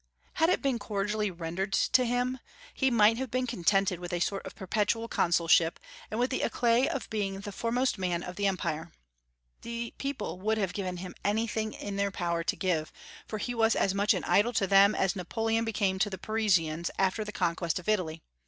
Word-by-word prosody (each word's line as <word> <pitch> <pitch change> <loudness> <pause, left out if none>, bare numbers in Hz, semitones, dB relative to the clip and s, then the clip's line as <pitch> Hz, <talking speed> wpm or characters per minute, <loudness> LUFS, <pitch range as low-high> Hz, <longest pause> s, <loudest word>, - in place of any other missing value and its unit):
Had 325 +1 +3
it 365 - +1
been 265 -4 +1
cordially 210 0 -1
rendered 175 +3 -4
to 255 - +3
him, 245 +2 0 0.3
he 265 - +2
might 225 -2 +5
have 260 0 -3
been 255 +2 0
contented 195 -3 +1
with 175 0 -6
a 175 - -1
sort 195 +3 -1
of - - -10
perpetual 215 +4 -1
consulship, 170 -3 +3 0.3
and 215 - -3
with 250 +2 +1
the 260 - 0
éclat 240 +2 +2
of 275 - -3
being 195 -2 -2
the 205 - -6
foremost 235 +2 0
man 175 -2 -1
of 180 - -7
the 200 +1 +1
Empire. 170 -3 -2 0.7
The 235 0 -5
people 275 -9 -4
would 215 +3 0
have 195 -4 -1
given 185 -3 -3
him 180 0 -7
anything 220 +1 0
in 200 -1 -5
their 200 0 +1
power 170 -3 -2
to 205 +4 0
give, 170 -6 -1 0.4
for 215 - -4
he 245 +4 -3
was 225 -1 +3
as 195 - +2
much 200 +1 +3
an - - -3
idol 230 +4 +3
to 210 -3 +2
them 195 +2 +6
as 190 -2 +1
Napoleon 225 +5 -1
became 200 -4 0
to 205 - +2
the 190 - -5
Parisians 180 -7 +1
after 195 +3 +1
the 210 - -6
conquest 170 -3 -1
of 180 - -7
Italy. 170 -7 0
200 Hz, 200 wpm, -29 LUFS, 180-225 Hz, 0.7 s, them